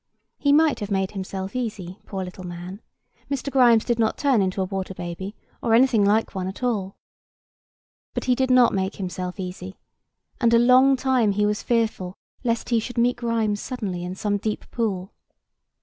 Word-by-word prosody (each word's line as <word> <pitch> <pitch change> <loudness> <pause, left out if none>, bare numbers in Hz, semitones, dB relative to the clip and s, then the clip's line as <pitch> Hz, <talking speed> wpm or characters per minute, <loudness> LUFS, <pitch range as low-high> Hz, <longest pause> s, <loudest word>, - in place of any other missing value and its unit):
He 285 - +3
might 305 0 +4
have 205 -2 -4
made 195 -2 0
himself 190 +1 -5
easy, 205 -7 -4
poor 190 -2 -4
little 185 +1 -9
man; 180 +3 -7 0.5
Mr. 280 0 -3
Grimes 240 -4 +5
did 240 -1 0
not 220 -1 +1
turn 270 -7 +3
into 190 0 -1
a 190 - +1
water 190 0 -4
baby, 180 +4 -6 0.3
or 225 -1 +3
anything 235 -3 +4
like 210 +3 +2
one 185 -1 -3
at 190 +6 -7
all. 205 -6 -1 1.2
But - - -2
he 255 - +3
did 260 +1 0
not 255 -1 +5
make 190 0 -1
himself 180 0 -5
easy; 185 0 -6 0.6
and 235 -2 +4
a - - +7
long 255 +3 +6
time 255 -5 +2
he 210 +1 +1
was 210 0 0
fearful 220 -6 -1 0.3
lest 230 -2 -1
he 235 -2 +3
should 245 +2 -6
meet 240 +1 +2
Grimes 225 -3 0
suddenly 200 -9 -4
in 180 +1 -5
some 205 +1 -1
deep 215 +1 -3
pool. 200 -5 -2
210 Hz, 180 wpm, -24 LUFS, 190-240 Hz, 1.2 s, a